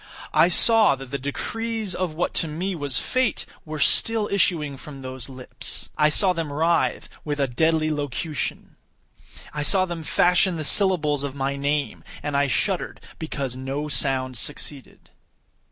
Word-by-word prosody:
I 170 - +6
saw 225 -2 +5
that 135 -1 -10
the 140 - -2
decrees 220 - -3
of 175 -3 -2
what 175 - -1
to 165 - -3
me 175 +6 -2
was 145 -7 0
Fate, 255 -5 0 0.2
were 155 -1 -5
still 220 +8 +3
issuing 165 -7 +1
from 135 0 -10
those 130 -1 -4
lips. 130 -1 -5
I 150 0 +4
saw 185 +4 +3
them 165 -4 -3
writhe 165 +4 +1 0.2
with 145 -1 -3
a 140 - +3
deadly 155 +4 +1
locution. 145 +1 -3 0.8
I 150 - -2
saw 185 +5 +3
them 175 -2 -5
fashion 180 +2 +3
the 155 - -3
syllables 150 -5 +3
of 140 -1 -4
my 140 0 -1
name; 145 +1 -1 0.2
and 145 -1 -2
I 140 0 +3
shuddered 130 - -1 0.2
because 140 -5 -4
no 135 +3 -3
sound 130 -2 0
succeeded. 145 -2 -5
150 Hz, 155 wpm, -24 LUFS, 140-175 Hz, 0.8 s, I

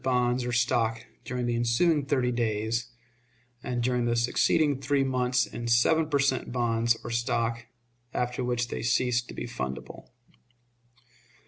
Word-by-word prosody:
bonds 125 -1 +1
or 125 - -2
stock 115 -1 +1 0.2
during 125 0 -3
the 120 0 0
ensuing 120 +7 +2
thirty 130 -3 +1
days, 115 0 -1 0.7
and 120 -1 -2
during 125 -1 +1
the 120 0 +1
succeeding 135 +4 +2
three 140 +1 +1
months 125 -1 +1
in 120 +2 -6
seven 150 +7 +3
per 145 - +2
cent. 135 -3 0
bonds 115 -1 +1
or 120 - -6
stock, 115 0 -1 0.4
after 125 0 -2
which 120 -1 -1
they - - -4
ceased 120 0 +1
to - - -9
be - - -4
fundable. 65 - -6
120 Hz, 145 wpm, -27 LUFS, 115-125 Hz, 0.7 s, seven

